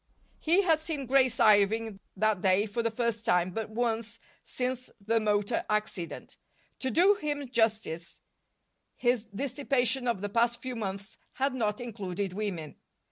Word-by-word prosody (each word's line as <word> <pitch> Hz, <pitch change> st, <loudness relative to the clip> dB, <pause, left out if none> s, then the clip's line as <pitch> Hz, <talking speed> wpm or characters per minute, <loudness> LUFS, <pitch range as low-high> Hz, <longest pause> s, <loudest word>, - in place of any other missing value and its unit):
He 345 Hz, +5 st, +3 dB
had 325 Hz, -4 st, +3 dB
seen 310 Hz, -3 st, -3 dB
Grace 260 Hz, -1 st, +3 dB
Irving 215 Hz, -1 st, +4 dB, 0.2 s
that 215 Hz, -1 st, +2 dB
day 190 Hz, +2 st, +3 dB
for 220 Hz, +2 st, -2 dB
the 230 Hz, -, +1 dB
first 230 Hz, -1 st, -2 dB
time 180 Hz, -6 st, +2 dB
but 220 Hz, +3 st, -4 dB
once 230 Hz, 0 st, -2 dB, 0.2 s
since 255 Hz, 0 st, -3 dB
the 225 Hz, +3 st, +1 dB
motor 210 Hz, -2 st, +1 dB
accident. 210 Hz, -5 st, -3 dB, 0.4 s
To 260 Hz, -, -1 dB
do 360 Hz, -, +5 dB
him 290 Hz, -7 st, -3 dB
justice, 220 Hz, -8 st, -1 dB, 0.8 s
his 240 Hz, -2 st, +1 dB
dissipation 255 Hz, +2 st, -1 dB
of 230 Hz, -5 st, 0 dB
the 205 Hz, -, -1 dB
past 235 Hz, +2 st, +2 dB
few 255 Hz, 0 st, -5 dB
months 200 Hz, -1 st, -5 dB
had 270 Hz, +1 st, 0 dB
not 215 Hz, -5 st, -1 dB
included 200 Hz, -5 st, -4 dB
women. 185 Hz, -7 st, -4 dB
225 Hz, 145 wpm, -29 LUFS, 205-255 Hz, 0.8 s, do